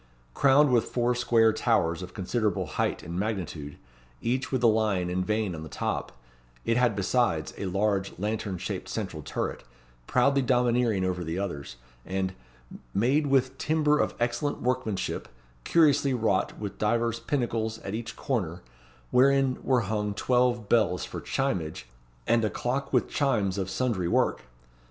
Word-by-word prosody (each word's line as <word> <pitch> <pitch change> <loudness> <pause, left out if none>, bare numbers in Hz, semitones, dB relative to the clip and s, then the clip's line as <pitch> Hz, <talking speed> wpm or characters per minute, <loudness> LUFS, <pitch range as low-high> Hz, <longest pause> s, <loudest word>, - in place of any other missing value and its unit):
Crowned 140 +1 +5
with 120 -3 +3
four 120 0 0
square 115 -2 +3
towers 95 -8 +1
of 90 -1 -9
considerable 105 +1 -1
height - - -2
and 85 +2 -4
magnitude, 90 -9 -4 0.4
each 130 - -1
with 130 -2 0
a - - +7
lion 105 -5 +1
and 90 +1 0
vane 105 -1 -1
on 80 - -6
the 80 - -8
top; - - -3 0.5
it 115 - +2
had 125 -3 +3
besides, 100 -5 +1
a 100 - -4
large, 100 +1 0
lantern 105 -1 -2
shaped - - -5
central - - -4
turret, - - -4 0.4
proudly 140 +2 +3
domineering 120 -5 +2
over 90 -1 -1
the 80 +1 -3
others, 70 -11 -4 0.3
and 95 0 -2 0.6
"made 135 +8 +2
with 135 -1 +1
timber 150 -1 +2
of - - 0
excellent 120 +5 -1
workmanship, 125 -5 -2 0.4
curiously 145 -5 +4
wrought 110 -5 0
with 100 -2 -6
divers 115 +1 +1
pinnacles 115 -3 -1
at 100 - -5
each 115 +1 -5
corner, 95 -10 -2 0.5
wherein 135 0 +4
were 130 -2 +2
hung 105 0 -2
twelve 120 -1 +1
bells 105 -6 +2
for - - -7
chimage, 90 - -2 0.4
and 115 -1 +3
a 110 - +2
clock 130 +6 -2
with - - +2
chimes 110 -10 +1
of 95 -1 -2
sundry 95 -3 -1
work." - - +1
110 Hz, 150 wpm, -27 LUFS, 95-125 Hz, 0.6 s, a